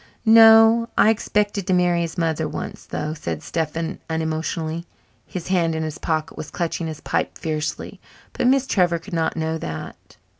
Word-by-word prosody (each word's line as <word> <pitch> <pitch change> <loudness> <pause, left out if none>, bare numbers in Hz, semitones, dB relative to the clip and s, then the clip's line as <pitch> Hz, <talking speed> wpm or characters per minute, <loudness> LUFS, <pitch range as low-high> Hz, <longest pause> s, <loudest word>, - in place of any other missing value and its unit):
"No. 225 +1 +7
I 220 - +6
expected 205 -3 -1
to 185 - +2
marry 175 -1 +2
his 170 +2 -4
mother 165 -2 0
once, - - -7
though," 150 0 -3
said 85 - -5
Stephen 165 0 -3
unemotionally. 160 +1 -3 0.4
His 180 -1 -6
hand 170 -3 +1
in 160 - -2
his 155 0 -5
pocket 155 -1 -2
was 155 - -7
clutching 170 -1 -3
his 155 -1 -7
pipe - - -2
fiercely, 155 -1 -4 0.3
but 245 - 0
Miss 270 +1 +3
Trevor 180 -8 +2
could 175 +4 -11
not 165 0 0
know 160 0 -2
that. 80 - -8
165 Hz, 165 wpm, -22 LUFS, 160-190 Hz, 0.4 s, No